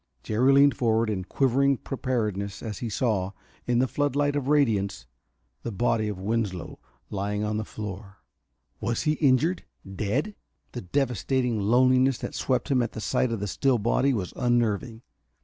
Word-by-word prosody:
Jerry 120 Hz, +5 st, +2 dB
leaned 140 Hz, 0 st, +5 dB
forward 115 Hz, -2 st, +1 dB
in 95 Hz, -3 st, -3 dB
quivering 135 Hz, +5 st, +2 dB
preparedness 105 Hz, -8 st, -3 dB
as 110 Hz, -4 st, -5 dB
he 120 Hz, -, -3 dB
saw, 105 Hz, -4 st, 0 dB, 0.3 s
in 120 Hz, -1 st, +2 dB
the 130 Hz, +2 st, +3 dB
floodlight 145 Hz, +1 st, 0 dB
of 140 Hz, -2 st, -2 dB
radiance, 105 Hz, -, +1 dB, 0.6 s
the 120 Hz, -, -4 dB
body 110 Hz, +1 st, 0 dB
of 105 Hz, -2 st, -4 dB
Winslow 100 Hz, -2 st, -3 dB, 0.3 s
lying 105 Hz, +1 st, -2 dB
on 105 Hz, 0 st, -1 dB
the 110 Hz, -, -2 dB
floor. 100 Hz, -2 st, -8 dB, 0.6 s
Was 115 Hz, -, -1 dB
he 155 Hz, -, +2 dB
injured? 155 Hz, +4 st, +2 dB, 0.2 s
Dead? 110 Hz, -, -2 dB, 0.4 s
The 120 Hz, -, -6 dB
devastating 125 Hz, +2 st, 0 dB
loneliness 130 Hz, +4 st, +4 dB
that -, -, -6 dB
swept 130 Hz, +3 st, -1 dB
him 130 Hz, -2 st, +3 dB
at 120 Hz, -, -2 dB
the -, -, -6 dB
sight 115 Hz, +3 st, 0 dB
of 115 Hz, -3 st, -3 dB
the 105 Hz, -, -2 dB
still 130 Hz, +5 st, +1 dB
body 120 Hz, +5 st, +2 dB
was 100 Hz, -8 st, -3 dB
unnerving. 120 Hz, -1 st, 0 dB
115 Hz, 160 wpm, -26 LUFS, 105-130 Hz, 0.6 s, leaned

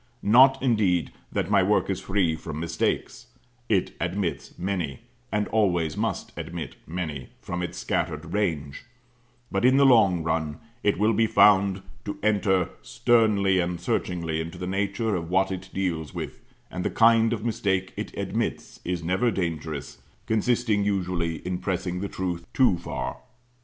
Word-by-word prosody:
Not, 130 Hz, +6 st, +6 dB
indeed, 105 Hz, -9 st, +2 dB, 0.2 s
that -, -, -1 dB
my -, -, +5 dB
work -, -, +2 dB
is -, -, -1 dB
free 95 Hz, -5 st, +1 dB
from 80 Hz, -1 st, -6 dB
mistakes; 85 Hz, 0 st, -2 dB, 0.4 s
it 95 Hz, -4 st, +2 dB
admits 90 Hz, +1 st, -3 dB
many, 90 Hz, -7 st, -3 dB, 0.3 s
and 105 Hz, 0 st, 0 dB
always 90 Hz, -8 st, +1 dB
must -, -, -2 dB
admit -, -, -6 dB
many, 80 Hz, -6 st, -4 dB
from 90 Hz, 0 st, -4 dB
its 90 Hz, -, -4 dB
scattered 80 Hz, +2 st, -2 dB
range; 80 Hz, -9 st, -1 dB, 0.7 s
but, 95 Hz, +1 st, 0 dB
in 130 Hz, +2 st, +5 dB
the 140 Hz, -, +6 dB
long 100 Hz, -10 st, +5 dB
run, 80 Hz, -2 st, -1 dB, 0.2 s
it 105 Hz, -, +2 dB
will 110 Hz, +3 st, +3 dB
be 110 Hz, +1 st, +3 dB
found 100 Hz, -2 st, +4 dB, 0.2 s
to 100 Hz, -1 st, -4 dB
enter 100 Hz, -4 st, +2 dB
sternly 105 Hz, -5 st, +3 dB
and 85 Hz, 0 st, -1 dB
searchingly 85 Hz, -3 st, -1 dB
into 80 Hz, 0 st, -7 dB
the 90 Hz, -, -5 dB
nature 100 Hz, +3 st, -1 dB
of 85 Hz, -2 st, -4 dB
what 95 Hz, +1 st, +2 dB
it 95 Hz, 0 st, -5 dB
deals 85 Hz, -6 st, -2 dB
with, -, -, -6 dB, 0.3 s
and 90 Hz, -, -4 dB
the -, -, 0 dB
kind 115 Hz, 0 st, +5 dB
of 115 Hz, -1 st, -2 dB
mistake 95 Hz, -5 st, 0 dB
it -, -, -5 dB
admits -, -, -3 dB
is 90 Hz, -1 st, -3 dB
never 95 Hz, +8 st, +1 dB
dangerous, 80 Hz, -6 st, -4 dB, 0.3 s
consisting, 110 Hz, -1 st, +1 dB
usually, 90 Hz, -4 st, -1 dB
in 90 Hz, 0 st, -2 dB
pressing 90 Hz, -1 st, -2 dB
the 100 Hz, +1 st, -3 dB
truth 85 Hz, -2 st, -4 dB
too 130 Hz, -8 st, +5 dB
far. -, -, -4 dB
95 Hz, 155 wpm, -26 LUFS, 85-105 Hz, 0.7 s, Not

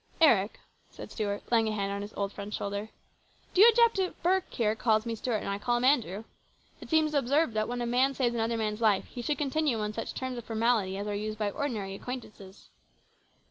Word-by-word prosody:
" -, -, -29 dB
Eric," 200 Hz, -2 st, +1 dB, 0.3 s
said -, -, -10 dB
Stuart, 205 Hz, -1 st, -3 dB
laying 225 Hz, -2 st, +4 dB
a -, -, 0 dB
hand 200 Hz, -1 st, -2 dB
on 200 Hz, 0 st, -3 dB
his 205 Hz, +1 st, -7 dB
old 200 Hz, 0 st, -2 dB
friend's 205 Hz, +1 st, -6 dB
shoulder, 200 Hz, +2 st, -4 dB, 0.3 s
" -, -, -34 dB
do 375 Hz, -, +4 dB
you 455 Hz, -, +10 dB
object 465 Hz, -2 st, +4 dB
if 370 Hz, -1 st, -2 dB
Burke 370 Hz, +2 st, +1 dB
here 215 Hz, -3 st, +1 dB
calls 220 Hz, 0 st, +1 dB
me 230 Hz, -, -2 dB
Stuart 225 Hz, -1 st, -2 dB
and -, -, -5 dB
I 200 Hz, 0 st, -2 dB
call 240 Hz, +2 st, +1 dB
him 240 Hz, -, -2 dB
Andrew? 225 Hz, -, +2 dB, 0.6 s
It -, -, -11 dB
seems 315 Hz, -1 st, +2 dB
absurd 280 Hz, 0 st, +2 dB
that 215 Hz, 0 st, 0 dB
when 245 Hz, 0 st, -3 dB
a -, -, -1 dB
man 255 Hz, +3 st, +2 dB
saves 245 Hz, -3 st, +1 dB
another 230 Hz, 0 st, 0 dB
man's 215 Hz, 0 st, -2 dB
life 210 Hz, -4 st, +3 dB
he 245 Hz, -, -8 dB
should 295 Hz, +5 st, -1 dB
continue 295 Hz, -3 st, 0 dB
on 210 Hz, 0 st, -2 dB
such 225 Hz, -, -5 dB
terms 260 Hz, -2 st, -4 dB
of -, -, -9 dB
formality 220 Hz, -4 st, +1 dB
as 200 Hz, -, -4 dB
are 210 Hz, -, -3 dB
used 215 Hz, +1 st, -3 dB
by 210 Hz, -1 st, -1 dB
ordinary 210 Hz, -7 st, -3 dB
acquaintances." 210 Hz, -4 st, -9 dB
225 Hz, 230 wpm, -29 LUFS, 210-255 Hz, 0.6 s, you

